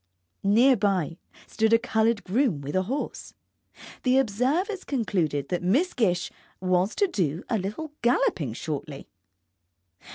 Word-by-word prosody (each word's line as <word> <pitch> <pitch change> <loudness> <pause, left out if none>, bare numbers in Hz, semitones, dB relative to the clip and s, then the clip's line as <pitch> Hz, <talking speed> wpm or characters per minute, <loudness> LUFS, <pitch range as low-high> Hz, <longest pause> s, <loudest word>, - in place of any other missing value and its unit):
Near 235 +7 +5
by 190 -5 0 0.3
stood 220 0 +1
a - - +8
coloured 225 -2 +1
groom 210 - +1
with 145 +4 -5
a 185 - +3
horse. 280 +3 -4 0.7
The 255 0 +3
observers 270 - 0
concluded 180 - -1
that 180 - -1
Miss 260 - +2
Gish 180 -7 0 0.3
was 185 +2 +1
to 410 - +3
do 170 - -1
a 225 - +1
little 215 +12 -5
galloping 210 - +1
shortly. 145 +1 -6
210 Hz, 130 wpm, -26 LUFS, 180-255 Hz, 0.7 s, a